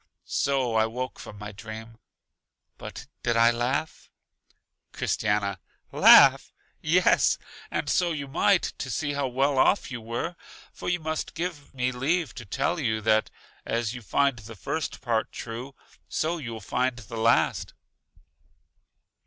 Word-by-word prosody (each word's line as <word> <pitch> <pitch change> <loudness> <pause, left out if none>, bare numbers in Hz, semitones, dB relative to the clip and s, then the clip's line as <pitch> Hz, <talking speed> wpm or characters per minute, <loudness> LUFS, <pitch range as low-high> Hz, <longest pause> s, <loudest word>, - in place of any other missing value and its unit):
So 135 -4 0
I 110 0 +3
woke 125 +3 -5
from 105 - -10
my 105 0 -7
dream. 110 +1 -9 0.8
But - - -8 0.2
did 120 -1 +1
I 115 +1 +6
laugh? 125 +6 -2 0.8
Christiana: 100 -2 0 0.3
Laugh! - - +7 0.3
Yes, 175 +4 +4 0.3
and - - -2
so 175 -1 +2
you 145 -3 -4
might, 175 +6 +3 0.2
to 135 - -4
see 145 +3 -1
how 140 -1 0
well 135 +2 +1
off 185 +1 +3
you 120 -2 -5
were! 120 +10 -4 0.4
For - - -5
you 180 0 +1
must 155 -1 -4
give 165 -4 -4
me 125 0 0
leave 150 +6 0
to 120 - -9
tell 140 - -1
you, 110 -7 0
that 110 0 +2 0.3
as 115 -1 -1
you 125 - -7
find 135 +3 +1
the 110 +1 -10
first 160 +9 -4
part 115 -3 0
true, 120 +4 -7 0.3
so 165 +2 -1
you 120 -6 -6
will 110 - -7
find 125 +5 -1
true 120 - -10
the 115 +3 -7
last. 115 - +2
125 Hz, 150 wpm, -26 LUFS, 115-145 Hz, 0.8 s, Laugh